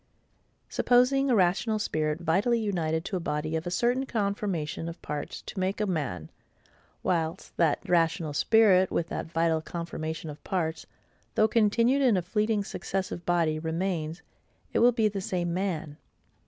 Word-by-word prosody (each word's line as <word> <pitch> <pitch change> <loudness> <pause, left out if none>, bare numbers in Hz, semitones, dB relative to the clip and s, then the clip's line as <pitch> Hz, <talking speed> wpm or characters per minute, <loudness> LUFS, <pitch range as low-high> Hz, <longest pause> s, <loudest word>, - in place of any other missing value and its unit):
Supposing 260 +3 +3
a 245 - +4
rational 195 +4 +2
spirit 155 -5 -1
vitally 200 +8 +2
united 165 -6 -1
to 190 - -2
a - - -3
body 155 -1 -2
of 160 +2 -3
a - - 0
certain 245 +8 +1
conformation 200 -8 -2
of 170 - -9
parts 150 -1 -5
to 195 - -7
make 190 +3 -1
a 210 - +1
man; 140 - -3 0.7
whilst 165 -3 -1
that 165 -3 +1
rational 165 -3 +1
spirit, 190 +2 +4
with 170 0 -1
that - - -4
vital 165 -1 +1
conformation 160 -1 -5
of 145 - -13
parts, 165 -4 -2 0.5
though 215 - +5
continued 230 +5 +3
in 245 -7 +4
a 180 - -1
fleeting 210 +3 0
successive 190 -3 -4
body, 165 -3 +2
remains, 165 0 -2 0.5
it - - +2
will 240 +1 +6
be 225 -2 +2
the 200 -2 -3
SAME 175 -2 -2
MAN. 170 -6 -3
180 Hz, 155 wpm, -28 LUFS, 160-210 Hz, 0.7 s, will